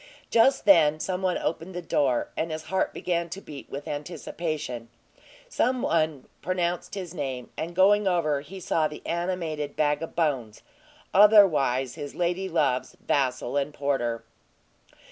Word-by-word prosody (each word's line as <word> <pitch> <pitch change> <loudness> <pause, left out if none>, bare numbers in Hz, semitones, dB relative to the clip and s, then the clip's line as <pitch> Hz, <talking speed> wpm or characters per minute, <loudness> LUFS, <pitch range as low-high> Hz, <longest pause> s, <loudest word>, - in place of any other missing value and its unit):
Just 235 +3 +4
then 155 -6 +6
some 185 +2 -2
one 185 -1 +1
opened 170 +3 -3
the 180 - -3
door, 135 -6 +1
and 165 - -2
his 155 0 -4
heart 190 - +1
began 170 -1 -2
to 190 - -6
beat 145 -7 -10
with 140 +3 -7
anticipation; 150 -5 -4 0.6
some 255 +1 0
one 155 -4 0 0.2
pronounced 175 +1 -2
his 180 -4 -6
name, 135 -6 -5
and, 170 +2 -5
going 200 +2 +5
over, 155 -6 +1
he 190 +7 -10
saw 160 -3 +1
the 150 - -11
animated 165 -4 -2
bag 150 0 +1
of 165 - -6
bones 135 -10 -1 0.5
otherwise 165 - +5
his 145 - -7
lady 180 +2 -1
love's 145 -7 0
vassal 130 -2 0
and 145 +1 -1
porter. 120 -5 -1
160 Hz, 145 wpm, -26 LUFS, 145-180 Hz, 0.6 s, then